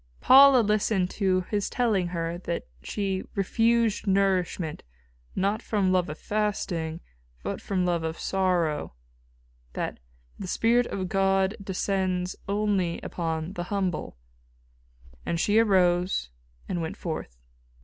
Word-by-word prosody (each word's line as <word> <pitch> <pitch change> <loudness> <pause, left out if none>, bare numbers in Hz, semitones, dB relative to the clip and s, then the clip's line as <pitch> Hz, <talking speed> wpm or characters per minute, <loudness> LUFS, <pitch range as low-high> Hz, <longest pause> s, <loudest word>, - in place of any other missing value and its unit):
Paula 270 -1 +8
listened 210 -3 +1
to 185 -3 +1
his 205 -2 0
telling 215 -8 +1
her 170 0 -3
that 170 -2 -4 0.2
she 195 - -2
"refused 225 +2 +1
nourishment 190 -4 +1 0.5
not 200 +3 0
from 200 -4 +1
love 180 -3 +2
of 150 - -6
fasting, 175 -6 -2 0.4
but - - -4
from 185 -2 -1
love 175 -2 +1
of 160 0 -3
sorrow"; 175 - 0 0.8
that - - -4 0.4
"the 190 - -5
spirit 235 +5 +2
of 190 -2 -3
God 195 +1 +2
descends 185 -1 -1
only 200 -4 0
upon 165 0 -3
the 175 -2 -4
humble," 185 - -2 1.1
and 170 - -2
she 210 +5 +3
arose 180 - +2 0.4
and 175 - -2
went 160 - -4
forth. 155 - -5
190 Hz, 120 wpm, -27 LUFS, 175-205 Hz, 1.1 s, Paula